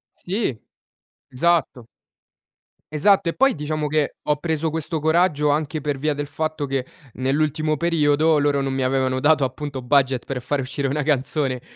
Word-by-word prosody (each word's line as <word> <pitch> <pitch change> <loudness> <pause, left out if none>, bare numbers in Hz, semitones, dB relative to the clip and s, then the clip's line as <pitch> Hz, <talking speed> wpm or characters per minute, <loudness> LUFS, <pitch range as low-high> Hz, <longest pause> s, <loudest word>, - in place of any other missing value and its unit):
Sì, 185 - -2 0.7
esatto. 130 -4 0 1.0
Esatto 180 +5 +3
e 165 - 0
poi 270 +1 +4
diciamo 150 0 -3
che 150 -1 0
ho 150 0 +1
preso 160 0 -1
questo 160 0 -3
coraggio 160 -2 +2
anche 150 +1 -1
per 145 -1 -2
via 150 +2 0
del 145 0 -4
fatto 155 +1 -3
che 135 -2 -2 0.3
nell'ultimo 155 +4 0
periodo, 155 -1 +2
loro 145 -1 +1
non 135 -1 -2
mi 135 - -1
avevano 130 0 +1
dato 150 +1 +3
appunto 135 0 -4
budget 130 -1 +2
per 130 -2 -4
far 140 +3 -1
uscire 135 +1 -2
una 145 +2 -1
canzone, 135 -2 0
145 Hz, 160 wpm, -22 LUFS, 135-155 Hz, 1.0 s, poi